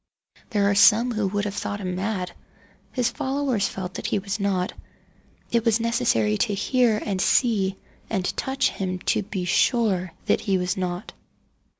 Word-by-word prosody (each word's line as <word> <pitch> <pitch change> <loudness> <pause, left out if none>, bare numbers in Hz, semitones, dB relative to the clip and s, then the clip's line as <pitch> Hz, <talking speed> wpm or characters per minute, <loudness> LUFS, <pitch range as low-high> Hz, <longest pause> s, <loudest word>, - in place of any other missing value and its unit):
There 205 -3 +2
are 205 - +3
some 220 +4 +6
who 215 -3 0
would 205 +1 -1
have 205 - -3
thought 205 0 -3
him 185 -2 -3
mad. 185 -1 -2 0.6
His 245 -2 0
followers 265 -5 0
felt 185 -1 -6
that - - -4
he - - +1
was 200 +1 -3
not. 190 -2 0 0.8
It 235 -1 +2
was 230 -1 +3
necessary 115 - +1
to 205 - +1
hear 225 +2 +2
and 195 -3 -1
see 195 -4 +2 0.3
and 190 -4 -1
touch 265 0 0
him 185 -1 -3 0.2
to - - 0
be 195 -2 -4
sure 185 -2 +2
that - - +2
he 195 -2 +1
was 180 +1 -1
not. 180 +1 -4
200 Hz, 170 wpm, -24 LUFS, 185-225 Hz, 0.8 s, some